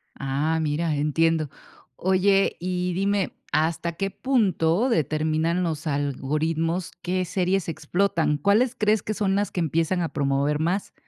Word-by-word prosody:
Ah, 145 +4 -1
mira, 155 +1 0
entiendo. 155 +1 +1 0.5
Oye, 195 +1 +2
y 180 0 -2
dime, 195 +1 0 0.2
¿hasta 160 +2 0
qué 195 +4 -2
punto 205 -4 +1
determinan 160 - +1
los 160 -2 -3
algoritmos 155 +4 -1
qué 185 +1 -1
series 185 0 0
explotan? 165 -1 0
¿Cuáles 215 - +2
crees 215 -2 +2
que 215 - -2
son 195 -2 0
las 205 +1 0
que - - -3
empiezan 165 +2 0
a 165 - -1
promover 140 +1 0
más? 175 +5 -1
170 Hz, 135 wpm, -24 LUFS, 155-190 Hz, 0.5 s, Oye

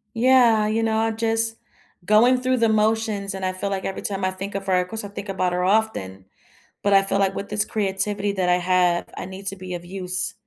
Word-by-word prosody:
Yeah, 235 -3 +4
you 220 +1 0
know, 220 -1 +1
I 225 0 +1
just 225 0 -1 0.5
going 235 +6 +5
through 255 0 +1
the 230 -2 +3
motions, 215 -2 0
and 190 -1 -6
I 185 - 0
feel 185 +2 -3
like 195 -1 -2
every 195 - -4
time 195 -1 -3
I 185 - +2
think 195 +2 -6
of 195 0 -4
her 185 -1 +3
of 180 - -2
course, 225 +2 -5
I - - -5
think 200 +1 -8
about 185 -2 0
her 180 0 0
often. 180 - 0 0.6
But 200 - +2
I 195 - +7
feel 195 0 0
like 195 -1 +1
with 200 - -5
this 210 0 0
creativity 200 0 -1
that 185 -2 0
I 180 - +5
have, 180 -1 +2
I - - -5
need 190 +1 -9
to 195 - -2
be 185 -1 -7
of 175 0 -8
use, 185 0 -3
200 Hz, 240 wpm, -23 LUFS, 185-220 Hz, 0.6 s, I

